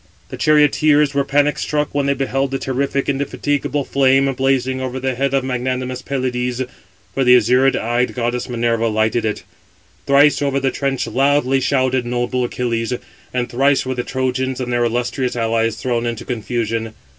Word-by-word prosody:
The - - -6
charioteers 150 -1 +3
were 140 0 +1
panic 145 +2 +1
struck 150 -1 -1
when 140 -1 0
they 140 - +2
beheld 135 0 -1
the 135 - -2
terrific, 135 +1 -2
indefatigable 140 0 -1
flame, 135 0 +3
blazing 130 0 0
over 130 0 -3
the 130 0 -1
head 135 +2 -1
of 135 - +1
magnanimous 130 0 -2
Pelides; 125 -2 -2 0.5
for 135 - +1
the 125 0 +7
azure 125 +3 +3
eyed 120 +2 -1
goddess 120 0 -2
Minerva 115 -1 0
lighted 110 +1 0
it. 105 - -2 0.6
Thrice 145 +2 +5
over 140 -1 +1
the 135 -1 0
trench 135 -1 -1
loudly 135 +2 +2
shouted 130 -2 +1
noble 120 +1 -1
Achilles, 120 -1 -2 0.4
and 125 -1 -1
thrice 135 +2 +2
were 130 - -2
the 125 - -2
Trojans 130 0 -2
and 125 -1 -3
their 120 0 +2
illustrious 120 +2 -1
allies 115 -1 0
thrown 120 0 -2
into 120 0 -4
confusion. 115 -1 -3
130 Hz, 165 wpm, -19 LUFS, 120-135 Hz, 0.6 s, the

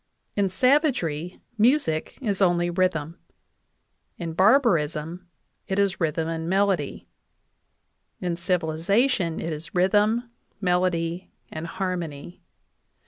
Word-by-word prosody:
In 200 -2 +2
savagery, 235 - +1 0.2
music 220 - +2
is 205 -4 -1
only 175 -2 +3
rhythm; 170 -3 -1 1.0
in 165 -2 -5
barbarism, 180 - +2 0.4
it 190 - -2
is 200 -2 +1
rhythm 160 0 0
and 165 0 -3
melody; 195 -6 0 1.1
in 175 -2 -2
civilization, 175 - +1
it 165 - -3
is 155 +2 -8
rhythm, 210 +6 +2 0.3
melody 180 -2 0 0.2
and 160 +1 -5
harmony. 175 -4 -5
180 Hz, 95 wpm, -25 LUFS, 165-200 Hz, 1.1 s, only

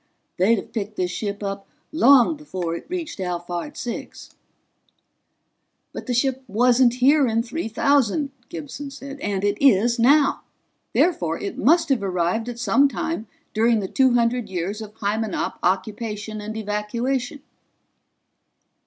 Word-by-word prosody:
They'd 195 +6 +4
have - - -7
picked 210 -1 -4
this 180 -2 -1
ship 205 -1 -4
up 195 0 -4 0.2
long 280 0 +5
before 185 - -4
it - - -8
reached 340 - -5
Alphard 175 +6 -4
Six." 240 - -6 1.6
"But - - -7
the 250 - 0
ship 265 +1 0
wasn't 245 +3 +3
here 275 +2 +4
in 225 0 +1
3000," 280 +1 +1 0.2
Gibson 170 - -7
said, 275 0 -9
"and 200 -5 -2
it 205 0 0
is 235 -1 +4
now. 280 +4 +4 0.5
Therefore 175 - +1
it 200 - -5
must 325 +3 +4
have 265 -6 +2
arrived 185 +4 -1
at 240 - -6
some 275 +3 +3
time 215 -5 -3 0.3
during 225 +1 +3
the 195 - -3
two 260 +4 +3
hundred 235 -2 +1
years 190 +4 -3
of 215 0 -9
Hymenop 215 0 -2
occupation 210 +3 -2
and 215 +1 -6
evacuation." 235 +6 -2
225 Hz, 135 wpm, -23 LUFS, 200-265 Hz, 1.6 s, long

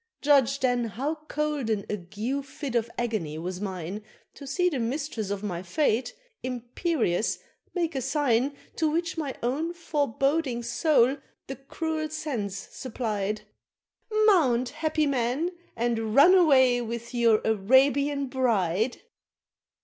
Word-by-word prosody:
Judge 275 -2 +4
then 245 -2 +2
how 260 +8 -2
cold 300 -5 -1
an 210 -2 0
ague 210 +8 -3
fit 270 -1 -6
of 235 -1 +1
agony 215 -11 -2
was 180 +3 -5
mine 190 0 -4 0.3
To 280 - -11
see 360 +7 +1
the 295 -7 0
mistress 235 -3 -2
of 200 0 -3
my 175 -4 -3
fate, 240 - 0 0.3
imperious, 245 - -1 0.4
make 335 -2 0
a 265 - -2
sign 270 -1 +1 0.2
To 320 -2 +2
which 335 +2 -1
my 295 -5 -3
own 300 +8 -1
foreboding 285 -4 0
soul 265 +1 +3 0.3
the 270 - -6
cruel 310 +3 -3
sense 265 -11 -3
supplied: 215 -5 -3 0.8
"Mount, 260 - +4
happy 310 0 0
man, 275 +5 0 0.2
and 225 -2 -1
run 325 +7 +8
away 260 -9 +5
with 235 +1 -5
your 230 -3 +4
Arabian 275 +7 +3
bride!" 230 -5 0
255 Hz, 125 wpm, -27 LUFS, 225-295 Hz, 0.8 s, run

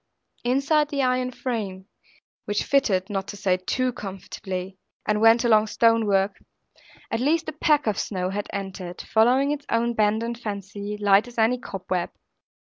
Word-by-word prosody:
Inside 280 +4 +2
the 280 -2 0
iron 255 0 +1
frame 215 -7 -4 0.6
(which 205 0 0
fitted, 200 -10 +2
not 195 -2 -3
to 205 - -7
say 185 -2 +1
too 250 +7 -1
comfortably, 190 -2 -6 0.3
and 210 0 +1
went 225 +2 +6
along 220 -3 +5
the 215 - -8
stonework), 210 -4 +3 0.7
at 225 - 0
least 315 +6 +1
a - - -3
peck 300 0 +2
of 215 -3 0
snow 185 -2 -2
had 205 +1 -4
entered, 190 -3 -6
following 255 +6 +3
its 290 -1 -4
own 235 +1 +1
bend 215 0 +2
and 235 0 -4
fancy; 205 -1 -5
light 205 +2 +4
as 240 - -13
any 230 +3 +3
cobweb. 185 -5 -3
215 Hz, 160 wpm, -24 LUFS, 195-250 Hz, 0.7 s, went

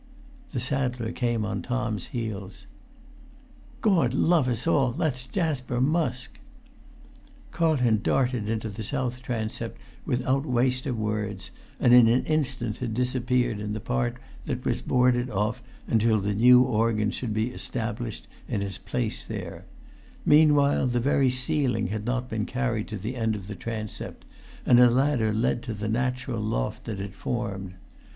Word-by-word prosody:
The 130 - -2
saddler 125 -3 -1
came 120 -3 -1
on - - -3
Tom's 120 -6 -2
heels. 105 -5 -5 1.2
"Gord 165 - +3
love 160 -3 +3
us 120 -2 -1
all, 135 -7 +2
that's 140 -5 -2
Jasper 130 -8 -1
Musk!" 130 -3 0 1.1
Carlton 130 -10 +2
darted 125 -3 +1
into 110 0 -2
the 105 +1 -7
south 125 +2 -2
transept 115 -4 -3 0.3
without 130 +2 0
waste 130 -1 +1
of 125 -4 -2
words, 105 -3 -3 0.3
and 120 -2 +5
in 125 -2 +8
an 120 +3 +3
instant 130 -8 0
had 120 -3 -3
disappeared 125 -2 +1
in 105 0 -3
the 110 - -3
part 65 - -1 0.3
that - - -3
was - - 0
boarded 125 0 +2
off 105 +4 -1 0.2
until 110 -1 +2
the 100 +1 -1
new 125 +4 +7
organ 110 -3 +1
should 120 -4 -3
be 110 +3 0
established 115 -2 -4 0.2
in 100 - -1
its 100 -1 -5
place - - -2
there; - - -7 0.6
meanwhile 145 -3 +5
the 120 -1 +1
very 135 +1 +3
ceiling 130 - +1
had 105 +1 -3
not 125 0 -1
been 110 -3 -2
carried 125 -4 -1
to 110 - -5
the 110 +7 -5
end 110 -2 0
of 100 -3 -7
the 105 - -6
transept, 110 0 -6 0.4
and 120 - +6
a 125 -1 +8
ladder 125 -3 +2
led 110 +2 0
to 115 - -5
the 105 +1 -4
natural 125 +1 -1
loft - - -2
that 105 -4 -4
it 100 0 -5
formed. 100 -5 -4
120 Hz, 155 wpm, -26 LUFS, 110-130 Hz, 1.2 s, in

